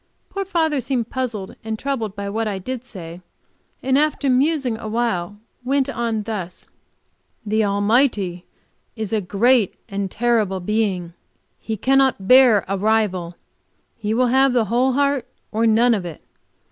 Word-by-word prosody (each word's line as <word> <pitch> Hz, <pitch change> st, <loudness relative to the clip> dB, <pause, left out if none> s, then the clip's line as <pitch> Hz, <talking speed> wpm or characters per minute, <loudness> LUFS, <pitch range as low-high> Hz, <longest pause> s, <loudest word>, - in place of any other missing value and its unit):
Poor 395 Hz, -, -2 dB
father 320 Hz, -6 st, 0 dB
seemed 240 Hz, -2 st, -2 dB
puzzled 230 Hz, -7 st, -4 dB
and 220 Hz, 0 st, -3 dB
troubled 230 Hz, -6 st, -3 dB
by 200 Hz, -1 st, -5 dB
what 220 Hz, +2 st, -2 dB
I 200 Hz, -2 st, -2 dB
did 250 Hz, +6 st, -5 dB
say, 180 Hz, -8 st, -9 dB, 0.6 s
and 265 Hz, +1 st, +3 dB
after 295 Hz, -2 st, +1 dB
musing 270 Hz, -2 st, +1 dB
a 220 Hz, -, -6 dB
while, 210 Hz, -4 st, -1 dB, 0.3 s
went 275 Hz, +1 st, +1 dB
on 230 Hz, -4 st, -2 dB
thus: 200 Hz, -5 st, -6 dB, 0.8 s
"The 215 Hz, +1 st, +1 dB
Almighty 205 Hz, -3 st, +1 dB, 0.5 s
is 220 Hz, -2 st, -4 dB
a 215 Hz, -, +1 dB
great 210 Hz, +3 st, +2 dB
and 195 Hz, -1 st, -3 dB
terrible 220 Hz, -4 st, +1 dB
Being. 185 Hz, -3 st, -1 dB, 0.5 s
He 220 Hz, -1 st, -4 dB
cannot 265 Hz, -4 st, +2 dB
bear 250 Hz, -5 st, +6 dB
a 195 Hz, 0 st, -2 dB
rival; 195 Hz, -5 st, 0 dB, 0.6 s
He 215 Hz, -1 st, -2 dB
will 250 Hz, +1 st, +2 dB
have 265 Hz, 0 st, +4 dB
the 240 Hz, -3 st, +2 dB
whole 250 Hz, +5 st, +1 dB
heart 280 Hz, -2 st, +1 dB, 0.2 s
or 225 Hz, +1 st, +1 dB
none 230 Hz, +2 st, +4 dB
of 200 Hz, -4 st, -1 dB
it. 170 Hz, -4 st, -8 dB
225 Hz, 150 wpm, -21 LUFS, 200-255 Hz, 0.8 s, bear